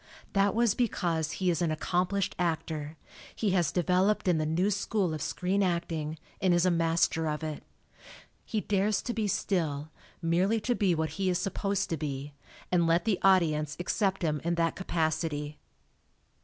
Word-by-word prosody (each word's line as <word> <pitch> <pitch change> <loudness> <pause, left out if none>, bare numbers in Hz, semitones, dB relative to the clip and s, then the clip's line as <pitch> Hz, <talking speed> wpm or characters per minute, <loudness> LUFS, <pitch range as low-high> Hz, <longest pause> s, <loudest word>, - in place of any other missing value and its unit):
That 195 0 +3
was 230 -2 +3
because 170 -10 0
he 185 -2 +1
is 170 - -1
an 170 - +2
accomplished 180 +5 0
actor 160 -3 -2 0.4
he 210 -3 0
has 175 -5 +2
developed 185 +4 +2
in 175 -3 +3
the 155 - 0
new 180 +6 +1
school 200 -3 0
of 155 - -4
screen 185 +6 0
acting, 165 -4 -1 0.2
and 185 -3 +4
is 175 +1 +3
a 185 - +4
master 165 -1 +1
of 150 +1 -2
it. 155 -1 -4 0.8
He 220 -3 -2
dares 205 +1 +1
to 240 - -2
be 220 -2 -1
still, 155 -6 -1 0.3
merely 180 +6 +2
to 245 - +1
be 195 -7 +2
what 160 0 -1
he 190 - +2
is 180 - +1
supposed 195 +1 -1
to 165 - 0
be, 140 -1 -4 0.4
and 170 -2 +3
let 170 +1 +2
the 210 -4 +1
audience 155 -6 +3
accept 195 +1 0
him 150 -3 0
in 170 +1 0
that 165 -1 +1
capacity. 155 -4 -2
175 Hz, 170 wpm, -29 LUFS, 160-195 Hz, 0.8 s, and